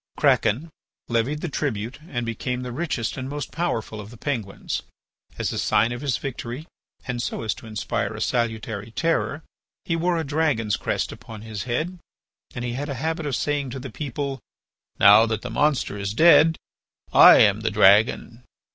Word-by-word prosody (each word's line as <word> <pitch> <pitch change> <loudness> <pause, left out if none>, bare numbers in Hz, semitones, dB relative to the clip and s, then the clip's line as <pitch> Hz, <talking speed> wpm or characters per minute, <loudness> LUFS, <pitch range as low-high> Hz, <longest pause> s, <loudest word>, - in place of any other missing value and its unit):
Kraken 145 +10 +2 0.4
levied 120 +6 0
the - - -2
tribute 125 -5 -3
and 120 -6 -3
became 125 +2 -3
the 125 - -5
richest 130 -4 -2
and 130 0 -4
most 145 -2 -5
powerful 115 -10 -3
of 105 - -11
the 120 - -13
Penguins. 115 -7 -3 0.6
As - - -2
a - - -2
sign 115 +3 +2
of 120 +1 -5
his 140 -3 0
victory 130 +1 -6 0.4
and 125 -2 -3
so 115 - -3
as 110 - 0
to 115 - -13
inspire 110 -2 -3
a - - -7
salutary 110 -3 -2
terror, 165 +3 -1 0.4
he 165 - 0
wore 170 +1 +1
a 165 - -1
dragon's 140 -8 0
crest - - -2
upon 110 -1 -10
his 110 -1 -6
head 160 +9 -2 0.6
and 125 - -4
he 120 - -3
had 145 +4 -4
a 140 - -3
habit 160 +3 -2
of 140 - -1
saying 145 -2 -1
to 130 - -6
the 130 -1 -8
people: 140 +1 -4 0.6
"Now 105 +3 +8
that 110 -2 -2
the 125 - -5
monster 145 -4 +1
is 100 +1 -3
dead 160 +1 +6 0.6
I - - +9
am - - +5
the - - -1
dragon." 110 +4 +4
125 Hz, 180 wpm, -24 LUFS, 110-145 Hz, 0.6 s, I